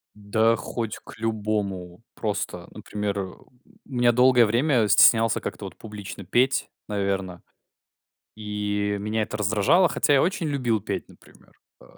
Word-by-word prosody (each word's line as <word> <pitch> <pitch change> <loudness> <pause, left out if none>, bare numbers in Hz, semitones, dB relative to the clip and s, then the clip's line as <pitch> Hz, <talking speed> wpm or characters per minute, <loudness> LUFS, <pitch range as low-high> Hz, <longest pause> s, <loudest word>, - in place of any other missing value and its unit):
Да 110 +2 +2
хоть 115 -1 -4
к - - -13
любому. 105 -4 -3
Просто, 105 -3 -4
например, 105 -1 -4
э, - - 0
у 95 - -14 0.4
меня 120 -3 +2
долгое 125 0 +5
время 120 +1 +2
стеснялся 115 +1 +5
как-то - - -6
вот - - -8
публично 105 -2 -8
петь, 125 +8 +1 0.2
наверно. 95 -3 -2 1.0
И 105 -1 -2
меня 110 +2 -1
это 105 - -4
раздражало, 110 - +3
хотя 145 - +1
я 135 - +4
очень 180 -1 -1
любил 125 -6 0
петь, 100 - -4
например, - - -20 0.3
э, - - -16
110 Hz, 140 wpm, -25 LUFS, 100-120 Hz, 1.0 s, долгое